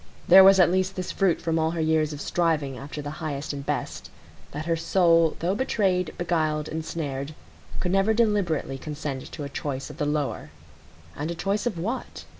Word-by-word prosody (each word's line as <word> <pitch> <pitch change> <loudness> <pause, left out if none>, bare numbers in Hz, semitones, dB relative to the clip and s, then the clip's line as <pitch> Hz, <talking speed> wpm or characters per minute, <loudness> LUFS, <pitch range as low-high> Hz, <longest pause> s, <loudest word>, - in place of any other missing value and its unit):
There 190 +2 +9
was 195 0 +7
at 175 -1 +6
least 185 +1 0
this 185 -1 -4
fruit 195 -4 +1
from 165 -1 0
all 160 0 +2
her - - -2
years 155 -1 +2
of 145 - -7
striving 155 -6 0
after 145 +3 -7
the 145 - -5
highest 145 -2 -3
and 140 -1 -6
best,—that 150 +2 -6
her 165 0 +1
soul 165 -1 +3
though 175 +3 +1
betrayed, 195 -7 0
beguiled, 155 -3 0
ensnared, 155 -3 -4 0.4
could 180 - -1
never 195 +3 +3
deliberately 195 -12 0
consent 145 -2 -5
to 150 - -6
a - - -4
choice 140 0 -5
of 150 - -13
the 150 -3 -1
lower. 145 - -2 0.7
And 150 +3 -4
a 170 - -3
choice 200 +6 -1
of 210 -7 -3
what? 220 +10 -4
160 Hz, 185 wpm, -25 LUFS, 150-180 Hz, 0.7 s, There